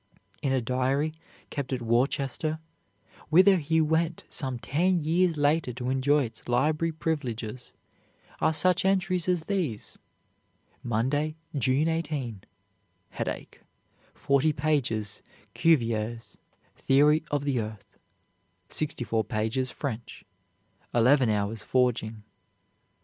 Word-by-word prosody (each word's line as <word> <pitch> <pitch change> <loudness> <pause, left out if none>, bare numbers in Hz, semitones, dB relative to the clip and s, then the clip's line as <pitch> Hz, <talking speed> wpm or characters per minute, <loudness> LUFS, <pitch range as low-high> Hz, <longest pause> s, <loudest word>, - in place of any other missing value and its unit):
In 135 - 0
a 130 -1 +2
diary 130 +5 0 0.4
kept 140 -3 -4
at 125 -2 -2
Worcester, 135 +6 0 0.7
whither 185 +4 +6
he 160 0 +1
went 160 +2 0
some 130 -4 -3
ten 170 +7 +1
years 170 +1 +2
later 145 -2 +2
to 125 +1 -3
enjoy 140 +2 +3
its 115 -2 -9
library 155 +6 +2
privileges, 125 -8 -4 0.7
are - - +3
such 180 +3 +3
entries 185 -2 +1
as 175 -3 +1
these, 170 - -3 0.8
"Monday, 135 +7 0 0.2
June 135 +4 +2
18, 145 - -2 0.7
headache, - - -5 0.5
40 140 +3 +2
pages 135 -8 -1 0.3
Cuvier's 115 -7 +1 0.4
'Theory 150 +3 +4
of 145 -1 -1
the 140 -4 0
Earth,' 105 -2 -7 0.7
64 120 -7 -1
pages 115 +3 -1
French, 120 -5 -6 0.7
11 125 +1 +5
hours' 105 +1 -1
forging. 115 -4 0
135 Hz, 105 wpm, -27 LUFS, 120-155 Hz, 0.8 s, whither